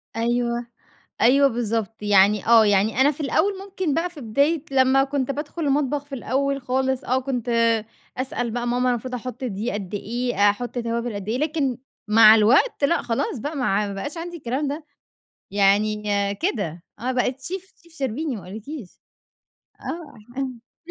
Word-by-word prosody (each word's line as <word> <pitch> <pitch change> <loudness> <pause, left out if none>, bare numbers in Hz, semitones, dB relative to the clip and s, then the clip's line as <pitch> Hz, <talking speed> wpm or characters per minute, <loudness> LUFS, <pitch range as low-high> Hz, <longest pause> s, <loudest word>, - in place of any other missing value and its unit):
أيوه، 235 +1 0 0.6
أيوه 275 +5 +5
بالضبط. 225 -3 -2
يعني 205 0 +4
آه. 230 -1 +7
يعني 205 +4 +2
أنا 275 +2 +6
في 300 +1 -9
الأول 380 +7 +1
ممكن 375 -6 -3
بقى 345 +2 0
في 330 -4 -11
بداية 280 +7 +1
لمّا 270 0 +4
كنت 275 -1 -2
بادخُل 300 +4 -4
المطبخ 285 0 +1
في 285 -1 -8
الأول 275 +2 -1
خالص 265 +1 -1
آه، 255 +2 +1
كنت 250 -3 -3 0.7
أسأل 250 -2 -2
بقى 240 +1 -3
ماما 250 +1 +1
المفروض 250 +1 -3
أحُط 250 +1 -6
دي 220 +1 -2
قد 200 -1 -5
إيه؟ 225 -1 +1
أحُط 240 +4 -4
توابِل 235 0 -2
قد 200 0 -6
إيه؟ 230 +3 0
لكن 290 -4 0 0.3
مع 215 0 +8
الوقت، 265 - +4
لأ 340 +4 +2
خلاص 230 +1 -2
بقى 295 +7 -4
مع 210 -6 +1
ما 200 - -5
بقاش 285 - -5
عندي 345 +1 -6
الكلام 275 0 -2
ده. 295 +3 -4 0.7
يعني 205 +1 +2 0.4
كده، 175 - -2 0.2
أنا 250 +4 -1
بقيت 255 +1 -1
شيف 380 +6 -6
شيف 340 -1 -20
شربيني 275 0 -2
ما 200 - -8
أقول 190 +4 -7
لكيش. 235 - -9 0.8
آه. 255 -5 -7
250 Hz, 165 wpm, -23 LUFS, 220-280 Hz, 0.8 s, مع